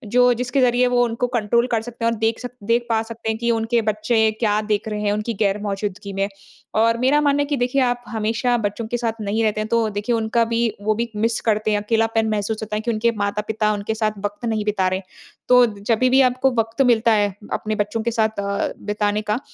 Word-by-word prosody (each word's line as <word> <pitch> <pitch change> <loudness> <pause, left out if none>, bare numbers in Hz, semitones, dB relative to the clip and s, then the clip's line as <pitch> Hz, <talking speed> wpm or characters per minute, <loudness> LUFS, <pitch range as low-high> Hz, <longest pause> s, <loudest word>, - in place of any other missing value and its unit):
जो 250 0 +6
जिसके 250 +2 0
ज़रिये 250 0 +3
वो 245 0 +3
उनको 240 +1 -1
कंट्रोल 235 +2 +2
कर 230 -3 0
सकते 230 0 -6
हैं, 230 - +3
और 230 - -3
देख 225 +1 0
सक 245 -1 -6 0.2
देख 240 +1 +2
पा 225 -1 +2
सकते 225 0 -6
हैं 220 - -1
कि 235 +1 0
उनके 230 +1 +1
बच्चे 215 +2 0 0.2
क्या 210 -2 +2
देख 210 +1 0
रहे 210 -1 -3
हैं 205 -1 +1
उनकी 215 +2 -2
ग़ैर-मौजूदगी 200 -1 -2
में। 195 0 0 0.5
और 230 +1 +3
मेरा 270 +4 +3
मानना 285 -1 +2
है - - +1
कि 290 -1 -1
देखिए, 250 +2 +1
आप 245 -1 +1
हमेशा 225 +2 0
बच्चों 205 +3 -3
के 240 - -2
साथ 230 -2 -3
नहीं 210 +2 -1
रहते 215 -1 0
हैं, 215 - -3
तो 230 -1 +1
देखिए 210 +3 -1
उनका 225 +1 +1
भी 230 0 -1 0.2
वो 215 +1 +1
भी 235 +2 -2
मिस 225 +2 0
करते 215 -1 +1
हैं, 210 - +2
अकेलापन 225 +1 +1
महसूस 215 0 -1
होता 215 0 -4
है 215 - -1
कि 235 - -1
उनके 230 +1 +1
माता-पिता 210 +1 -1
उनके 205 +1 -3
साथ 215 -1 0
वक़्त 205 +3 -4
नहीं 220 -2 -1
बिता 200 -3 +1
रहे। 185 +1 -1 0.5
तो 250 0 +7
जब 225 +5 +2
भी 265 +2 +5
आपको 255 +1 +2
वक़्त 225 +3 0
मिलता 235 -3 +4
है 205 -2 +2 0.2
अपने 215 0 -2
बच्चों 210 +2 -1
के 235 - 0
साथ 220 -2 0
अ, 200 0 -2
बिताने 210 0 -1
का, 210 +2 -1
225 Hz, 235 wpm, -21 LUFS, 210-235 Hz, 0.5 s, तो